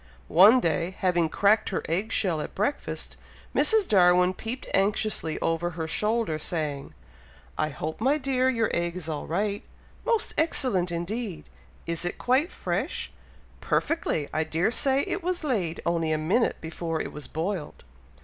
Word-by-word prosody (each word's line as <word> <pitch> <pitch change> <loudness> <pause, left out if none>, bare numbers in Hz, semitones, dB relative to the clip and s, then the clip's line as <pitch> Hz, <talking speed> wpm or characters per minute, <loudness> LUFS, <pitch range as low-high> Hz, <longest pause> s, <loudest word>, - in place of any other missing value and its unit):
One 205 +9 +7
day, 170 0 -1
having 175 -3 +1
cracked 205 +5 +3
her 190 - -2
egg 190 +7 -1
shell 170 -6 +1
at - - -7
breakfast, 215 +9 -3 0.4
Mrs. 440 -3 +4
Darwin 180 -2 +5
peeped 235 +6 -6
anxiously 195 -4 +1
over 165 +1 0
her 160 -1 -4
shoulder, 210 -2 0
saying, 150 -4 -3 0.6
"I 155 - 0
hope, 155 +5 -5
my 275 +5 +3
dear! 260 -2 +1
your 230 -4 +1
egg 170 0 -1
is 170 -3 -5
all 155 -2 -4
right?" 200 +5 -1 0.4
"Most 455 -1 0
excellent 235 - +1
indeed!" 185 +3 -4 0.4
"Is 170 0 -2
it 175 - -3
quite 265 +8 +2
fresh?" - - -2 0.5
"Perfectly! 240 - 0
I 155 - +1
dare 165 +6 0
say 270 +2 +2
it 390 - -2
was 355 -1 -2
laid 195 - -1
only 165 -2 +1
a 155 - +2
minute 180 +10 +1
before 165 0 -3
it - - -4
was 150 - -8
boiled!" 165 0 -4
180 Hz, 155 wpm, -26 LUFS, 165-235 Hz, 0.6 s, One